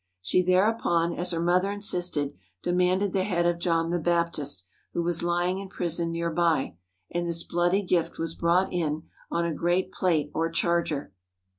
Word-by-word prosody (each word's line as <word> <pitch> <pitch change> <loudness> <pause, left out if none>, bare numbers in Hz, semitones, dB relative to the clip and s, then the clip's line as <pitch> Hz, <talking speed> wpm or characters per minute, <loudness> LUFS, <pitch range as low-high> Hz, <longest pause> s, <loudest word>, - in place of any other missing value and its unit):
She 95 - +2
thereupon, 180 -2 +2
as 175 +1 -2
her 170 -2 -1
mother 180 +3 +2
insisted, 180 -8 0 0.3
de 175 - 0
manded 180 +2 +2
the 190 - +2
head 175 -3 0
of 175 0 +1
John 165 -1 +1
the 175 - +1
Baptist, 160 - 0 0.3
who 170 - 0
was 170 0 +1
lying 175 +2 0
in 195 - -6
prison 170 -3 -1
near 170 0 -1
by, 165 - +1 0.4
and 175 0 -1
this 170 0 -2
bloody 175 +3 +1
gift 180 -3 0
was 165 0 -3
brought 175 +4 +2
in 160 -3 -1 0.3
on 170 0 0
a 170 - -1
great 175 +4 0
plate 155 -5 0
or 165 +1 0
charger. 165 - 0
170 Hz, 175 wpm, -27 LUFS, 165-180 Hz, 0.4 s, She